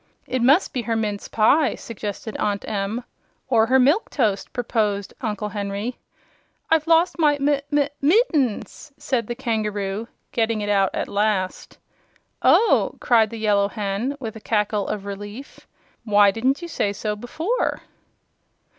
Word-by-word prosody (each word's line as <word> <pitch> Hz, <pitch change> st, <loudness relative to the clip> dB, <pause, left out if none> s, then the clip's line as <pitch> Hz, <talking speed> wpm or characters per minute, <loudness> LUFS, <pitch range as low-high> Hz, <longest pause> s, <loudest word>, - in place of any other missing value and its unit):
"It 255 Hz, -, -2 dB
must 280 Hz, +9 st, +4 dB
be 250 Hz, -, -1 dB
her 230 Hz, -1 st, -2 dB
mince 210 Hz, -2 st, -2 dB
pie," 270 Hz, +7 st, +3 dB
suggested 215 Hz, 0 st, -6 dB
Aunt 205 Hz, -1 st, -2 dB
Em. 210 Hz, +3 st, -2 dB, 0.5 s
"Or 225 Hz, -3 st, +4 dB
her 260 Hz, +2 st, +4 dB
milk 285 Hz, -, +3 dB
toast," 210 Hz, -7 st, 0 dB
proposed 210 Hz, -4 st, -1 dB
Uncle 210 Hz, -3 st, -3 dB
Henry. 205 Hz, +3 st, -4 dB, 0.7 s
"I've 320 Hz, -1 st, +3 dB
lost 335 Hz, +2 st, +3 dB
my 295 Hz, -2 st, +4 dB
mi 280 Hz, 0 st, +2 dB
mi 290 Hz, -1 st, +2 dB
mittens!" 300 Hz, -, +1 dB
said 235 Hz, -5 st, -1 dB
the 240 Hz, -, -3 dB
kangaroo, 215 Hz, -4 st, -2 dB, 0.2 s
getting 225 Hz, -2 st, 0 dB
it 205 Hz, -, -3 dB
out 195 Hz, -2 st, +3 dB
at -, -, -2 dB
last. 200 Hz, -2 st, -1 dB, 0.6 s
"Oh!" 460 Hz, -, +4 dB
cried 225 Hz, -3 st, +3 dB
the 230 Hz, -, -7 dB
Yellow 205 Hz, -2 st, +2 dB
Hen, 210 Hz, +6 st, -3 dB
with 225 Hz, -4 st, -6 dB
a 220 Hz, -, -9 dB
cackle 210 Hz, -2 st, 0 dB
of 200 Hz, -2 st, -4 dB
relief. 205 Hz, +6 st, -8 dB, 0.4 s
"Why 205 Hz, -2 st, +5 dB
didn't 260 Hz, -, 0 dB
you -, -, -4 dB
say 205 Hz, -11 st, -1 dB
so 210 Hz, +1 st, -3 dB
before?" 320 Hz, -, -2 dB
225 Hz, 145 wpm, -23 LUFS, 205-265 Hz, 0.7 s, Why